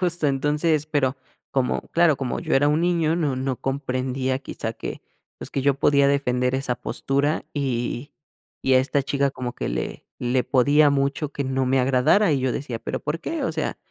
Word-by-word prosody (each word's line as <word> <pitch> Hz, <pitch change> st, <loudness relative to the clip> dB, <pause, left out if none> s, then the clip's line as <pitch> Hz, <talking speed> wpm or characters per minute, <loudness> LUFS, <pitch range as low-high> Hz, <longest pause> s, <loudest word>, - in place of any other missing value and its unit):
justo, 175 Hz, -4 st, 0 dB
entonces, 150 Hz, +3 st, +1 dB
pero 140 Hz, -4 st, 0 dB, 0.3 s
como, 130 Hz, -2 st, 0 dB
claro, 170 Hz, -3 st, +3 dB
como 130 Hz, -2 st, -3 dB
yo -, -, -1 dB
era 145 Hz, +2 st, +4 dB
un 150 Hz, +2 st, +2 dB
niño, 170 Hz, -2 st, +2 dB
no 150 Hz, -6 st, 0 dB
no 130 Hz, -1 st, -2 dB
comprendía 130 Hz, -1 st, -2 dB
quizá 115 Hz, -4 st, -5 dB
que, -, -, -7 dB, 0.4 s
pues, -, -, -8 dB
que 135 Hz, -, -2 dB
yo 140 Hz, 0 st, +3 dB
podía 140 Hz, 0 st, +3 dB
defender 125 Hz, -2 st, +1 dB
esa 130 Hz, -2 st, 0 dB
postura. 140 Hz, +5 st, -1 dB
Y 130 Hz, 0 st, -2 dB, 0.5 s
y 135 Hz, -, +2 dB
a 130 Hz, -, +7 dB
esta 140 Hz, +2 st, 0 dB
chica 140 Hz, 0 st, 0 dB
como 125 Hz, -2 st, -5 dB
que -, -, -3 dB
le -, -, -4 dB
le 125 Hz, +1 st, +1 dB
podía 145 Hz, +4 st, +4 dB
mucho 140 Hz, +1 st, 0 dB
que 140 Hz, 0 st, -3 dB
no 130 Hz, 0 st, 0 dB
me 130 Hz, +1 st, +2 dB
agradara 135 Hz, +9 st, +3 dB
y 140 Hz, -, +1 dB
yo 130 Hz, 0 st, +1 dB
decía, 125 Hz, -2 st, -4 dB
¿pero -, -, -4 dB
por 155 Hz, +3 st, -3 dB
qué? 330 Hz, -1 st, -3 dB
O -, -, -1 dB
sea, -, -, -2 dB
140 Hz, 195 wpm, -23 LUFS, 130-150 Hz, 0.5 s, a